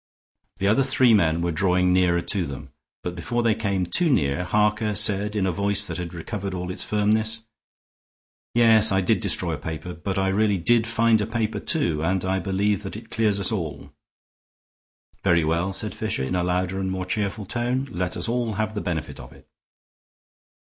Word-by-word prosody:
The 100 - 0
other 110 +6 +3
three 130 -2 +4
men 85 -5 +2
were 85 - 0
drawing 90 +1 +2
nearer 90 -1 +2
to 90 -1 -1
them, 70 -1 -8 0.3
but 90 - -4
before 120 +7 -2
they 115 -2 +3
came 100 -4 -1
too 165 - +2
near, 75 - +1
Harker 105 +3 +1
said, 105 0 +3
in 100 -2 +1
a 95 - +1
voice 100 +3 +1
that - - -5
had 85 -2 -5
recovered 95 +2 -5
all 90 0 -4
its - - -3
firmness: 110 +2 +1 1.1
"Yes, 110 -2 +6
I 95 0 +2
did 90 - +2
destroy - - -1
a - - -3
paper, 80 +2 -6
but 95 +3 -4
I 95 0 +1
really 100 +1 +2
did 115 +6 +2
find 115 0 +2
a 105 - -2
paper, 110 -1 -2
too; 85 - +1
and 95 +3 0
I 95 +1 0
believe 100 +2 0
that 100 0 -7
it 110 +1 -13
clears 105 -3 +1
us 100 - +1
all." 85 -9 -5 1.3
"Very 85 -4 +3
well," 85 +4 0
said 100 +2 -2
Fisher, - - -3
in 65 - -2
a 90 - 0
louder 90 +1 -1
and 95 -1 -2
more 95 0 -3
cheerful 100 +2 -3
tone; 125 +5 -2
"let 90 -2 -3
us - - -1
all 120 -1 -1
have 110 +1 -2
the 105 - -3
benefit 85 -4 -4
of - - -11
it." 70 0 -18
100 Hz, 195 wpm, -24 LUFS, 90-110 Hz, 1.3 s, Yes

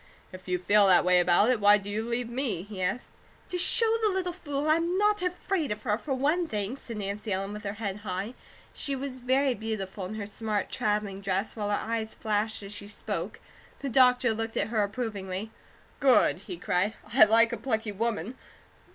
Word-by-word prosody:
"If 185 0 -12
you 180 0 0
feel 205 +3 +4
that 180 -2 +5
way 180 0 +5
about 180 +6 +4
it, 245 - +1
why 205 0 +6
do 200 -1 -9
you 210 +2 -2
leave 235 +1 -2
me?" 235 -7 -2
he 200 -2 -8
asked. 185 +7 -2 0.4
"To 360 - -2
show 455 +5 +5
the 435 - +3
little 370 -2 -1
fool 290 -4 -3
I'm 335 +3 +2
not 415 0 +2
afraid 360 - -1
of 210 0 -4
her, 210 -4 +1
for 275 -3 -2
one 305 +6 +1
thing," 210 -3 -3
said 235 -5 -8
Nancy 205 +1 -4
Ellen 195 +1 -2
with 210 +1 -7
her 200 - -2
head 200 -2 -4
high. 205 +2 -4 0.4
She 280 - -1
was 265 -1 -5
very 260 +2 +2
beautiful 205 -4 -4
in 205 +4 -6
her 210 -2 -4
smart 210 0 -3
travelling 210 -2 -1
dress, 195 +2 -1
while 210 -2 -3
her 205 - +2
eyes 220 -1 -3
flashed 215 0 -1
as 200 +1 -7
she 205 0 -8
spoke. 205 - -4 0.4
The 280 - -3
doctor 250 -2 +4
looked 225 +1 -4
at - - 0
her 220 -2 +1
approvingly. 205 -2 -3 0.5
"Good!" 260 -9 +4
he 180 - -5
cried. 180 +5 0 0.2
"I 240 -3 +8
like 230 +2 +4
a - - -2
plucky 220 -4 -2
woman! 225 +1 -3
220 Hz, 205 wpm, -28 LUFS, 200-260 Hz, 0.5 s, I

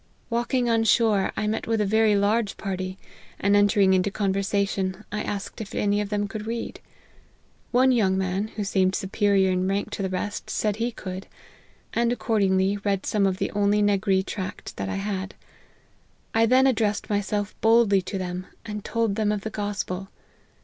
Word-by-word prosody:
Walking 240 +1 0
on 225 -1 +3
shore, 220 -4 +3
I - - 0
met 215 +1 -2
with 225 -1 +1
a 210 - +2
very 215 +1 +3
large 205 +1 +1
party; 185 -1 -4 0.4
and 200 +1 +3
entering 205 -1 +4
into 185 +1 +2
conversation, 195 0 -1
I 210 - -2
asked 200 +2 -5
if 205 - -7
any 205 0 +1
of 205 - -4
them 205 -1 -1
could 215 +1 -6
read. 230 +1 -4 0.9
One 255 +2 +4
young 195 -6 +2
man, 190 +2 -1
who 210 - -2
seemed 190 -1 +1
superior 195 -1 +2
in 185 0 0
rank 195 +1 -1
to - - -4
the 190 - -1
rest, 200 +2 -4
said 210 -1 0
he 235 +2 -1
could, 190 -3 -7 0.7
and 235 0 +2
accordingly 200 -4 +1
read 200 -1 -1
some 200 -2 +2
of 185 -1 -1
the - - -2
only 205 0 +2
N 205 0 +3
agree 190 -1 +2
tract 190 -1 -6
that 95 0 -3
I - - -2
had. 195 -1 -3 1.0
I 225 0 +4
then 260 +3 +5
addressed 220 -5 +1
myself 205 0 -1
boldly 225 -3 +5
to 195 +2 -5
them, 185 0 -4 0.2
and 210 -2 -5
told 230 -3 0
them 210 0 +1
of 210 -1 -2
the 220 - -5
gospel. 200 -2 -3
205 Hz, 180 wpm, -25 LUFS, 190-220 Hz, 1.0 s, then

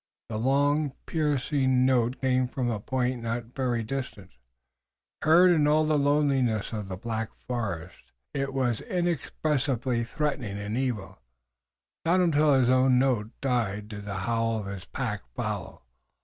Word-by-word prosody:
The 110 - -3
long, 145 +3 +2
piercing 140 -4 +1
note 125 -1 +2
came 130 -1 +2
now - - -20
from 125 -3 -1
a 110 - -2
point 125 +2 -1
not 115 +1 -4
very 125 -3 0
distant. 115 -5 -5 0.9
Heard 175 +4 +6
in 155 -4 +3
all 155 +1 +4
the 155 0 +2
loneliness 140 -7 +2
of 105 -3 -4
the 95 -1 -5
black 110 +2 -3 0.2
forest 95 -8 -4 0.2
it 135 0 -1
was 130 -4 0
inexpressively 145 - -1
threatening 125 -5 -2
and 105 +2 -4
evil. 105 - -3 0.8
Not 175 +3 +3
until 155 -4 +4
his 130 -2 +3
own 130 0 +4
note 125 -5 +2
died 110 -6 -1
did 105 -2 -7
the 100 -2 -4
howl 115 -1 0
of 105 - -4
his 100 -1 -6
pack 105 -1 -3
follow. - - -4
125 Hz, 150 wpm, -27 LUFS, 110-140 Hz, 0.9 s, Heard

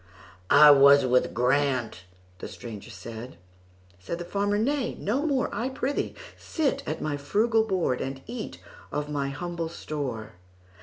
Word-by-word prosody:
"I 150 +1 +9
was 140 0 +7
with 125 0 +2
Grant"—the 115 -9 -2
stranger 110 -4 -9
said; 115 -4 -9 0.6
Said 100 - -5
the 175 - -6
farmer, 205 +2 0
"Nay, 245 +2 0
no 265 +10 -1
more,—I 255 -4 0
prithee 265 +1 -2 0.2
sit 280 -4 -1
at - - -3
my 145 -2 -1
frugal 220 +10 +2
board, 185 - 0
And 135 0 -5
eat 230 -1 -6 0.3
of 150 0 -3
my 140 -2 -1
humble 165 +3 -4
store. 135 -9 -5
145 Hz, 135 wpm, -27 LUFS, 125-215 Hz, 0.6 s, I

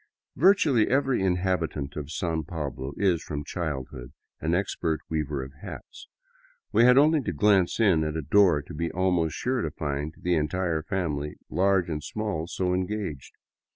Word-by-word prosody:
Virtually 155 - +4
every 135 -3 +1
inhabitant 90 -6 -1
of 75 -2 -5
San 80 0 -2
Pablo 70 -4 -5
is, 95 -4 +2
from 75 -1 -5
childhood, 65 -6 -5 0.3
an 80 +2 0
ex 95 +3 -1
pert 80 -2 -1
weaver 75 -3 -2
of 65 +1 -10
hats. - - -10 0.6
We 120 - +5
had 125 +1 +6
only 150 +2 +5
to - - -3
glance 95 +3 +3
in 95 -8 +4
at 75 0 -2
a 80 - -3
door 85 -2 +4
to - - -11
be 85 +3 -2
almost 90 -3 +1
sure 130 -1 -1
to - - -1
find 75 0 -4
the 90 - -1
entire 80 +1 0
family, 75 -6 -3 0.2
large 95 -1 +2
and 75 -3 -4
small, 105 -7 -3
so 90 0 -1
engaged. 95 -6 -3
85 Hz, 165 wpm, -26 LUFS, 75-100 Hz, 0.6 s, had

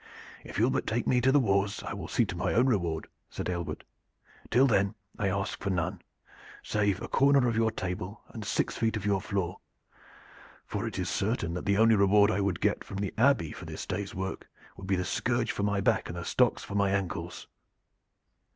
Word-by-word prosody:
"If - - -8
you 110 - +3
will 125 - +3
but 130 - -1
take 115 +2 0
me 125 -1 +3
to 130 - +4
the 145 - +5
wars 100 -3 +1
I - - -4
will 100 -6 -6
see 120 - +2
to 90 -3 -5
my 90 -1 -1
own 120 - +5
reward," 85 -10 0 0.2
said - - -5
Aylward. 85 -3 -4 0.7
"Till 125 +4 +5
then 100 -4 +2 0.2
I 100 - +1
ask 100 0 -2
for 100 - -2
none, 90 -4 -1 0.6
save 105 -2 +1
a - - -4
corner 140 -2 +4
of 115 - 0
your 115 0 +3
table 95 0 -5
and 110 - -7
six 105 - -1
feet 110 0 0
of 105 - -6
your 100 -2 +2
floor, 95 -3 -2 1.1
for - - -3
it - - -5
is - - -1
certain 85 0 -1
that 90 - -5
the 100 0 +3
only 115 +1 +6
reward 100 +1 +5
I 100 - 0
would 100 -3 -1
get - - +1
from 100 - -7
the 100 -1 -2
Abbey 115 - +3
for 85 - -9
this 80 -1 -6
day's 100 +1 -4
work 95 +1 -4 0.3
would 95 - -9
be 95 - +2
the 90 0 -1
scourge 120 -1 0
for - - -4
my 100 -1 +1
back 110 +2 +1
and 85 - -5
the 85 - -5
stocks - - +2
for - - -8
my 100 -1 +2
ankles. 95 -4 -3
100 Hz, 215 wpm, -29 LUFS, 95-110 Hz, 1.1 s, only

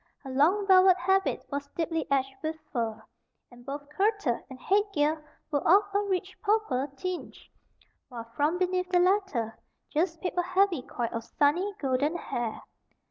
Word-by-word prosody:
Her 270 - -7
long 335 +10 +3
velvet 375 -1 +6
habit 385 +1 +1
was 280 0 -3
deeply 325 -1 -1
edged 270 -1 +1
with 315 0 -2 0.2
fur, 230 -4 -2 0.5
and 245 0 -15
both 285 +2 -6
kirtle 390 - 0
and 260 -1 -10
head 395 +10 +3
gear 300 +1 +1 0.3
were 285 -2 +1
of 390 +5 +6
a 405 - +3
rich 380 -2 -2
purple 410 - +1
tinge, 365 +5 -6 0.6
while 235 -3 -7
from 300 +4 +1
beneath 365 0 0
the 365 - +3
latter 355 - +1 0.3
just 330 +1 0
peeped 360 -1 -2
a - - +5
heavy 365 -3 +2
coil 240 -2 -3
of 230 - -4
sunny, 345 - +1
golden 280 +4 0
hair. 235 -8 -4
325 Hz, 160 wpm, -28 LUFS, 270-375 Hz, 0.6 s, velvet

